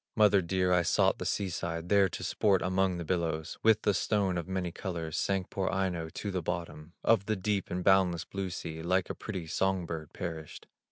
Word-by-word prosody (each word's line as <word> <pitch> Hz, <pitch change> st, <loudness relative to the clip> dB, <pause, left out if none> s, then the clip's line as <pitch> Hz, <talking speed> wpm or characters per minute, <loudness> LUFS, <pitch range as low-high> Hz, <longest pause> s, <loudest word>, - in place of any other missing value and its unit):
"Mother 105 Hz, -3 st, +5 dB
dear, 90 Hz, +1 st, +1 dB
I 90 Hz, -, +4 dB
sought 85 Hz, -, +2 dB
the -, -, -2 dB
sea 100 Hz, -2 st, -1 dB
side, 85 Hz, 0 st, -4 dB
There 100 Hz, 0 st, +4 dB
to -, -, -6 dB
sport 100 Hz, -4 st, +2 dB
among 95 Hz, 0 st, +1 dB
the 85 Hz, -, -5 dB
billows; 80 Hz, -3 st, -2 dB
With 110 Hz, -1 st, +4 dB
the 105 Hz, -, +3 dB
stone 100 Hz, -2 st, +1 dB
of 85 Hz, -1 st, -3 dB
many 95 Hz, -2 st, -2 dB
colors, 85 Hz, -4 st, -4 dB
Sank 95 Hz, -2 st, -1 dB
poor 95 Hz, -1 st, -1 dB
Aino 90 Hz, -4 st, -1 dB
to 100 Hz, +5 st, -5 dB
the 95 Hz, -1 st, -1 dB
bottom 85 Hz, -2 st, -5 dB
Of 105 Hz, -4 st, +3 dB
the 110 Hz, -, +1 dB
deep 100 Hz, 0 st, -1 dB
and 90 Hz, +1 st, -2 dB
boundless 90 Hz, -3 st, +3 dB
blue 95 Hz, -1 st, -4 dB
sea, 80 Hz, -2 st, -6 dB
Like 90 Hz, +2 st, +1 dB
a -, -, -3 dB
pretty 95 Hz, -6 st, -5 dB
song 95 Hz, +2 st, 0 dB
bird 80 Hz, -3 st, -6 dB
perished. 80 Hz, -3 st, -6 dB
90 Hz, 210 wpm, -30 LUFS, 85-95 Hz, -, Mother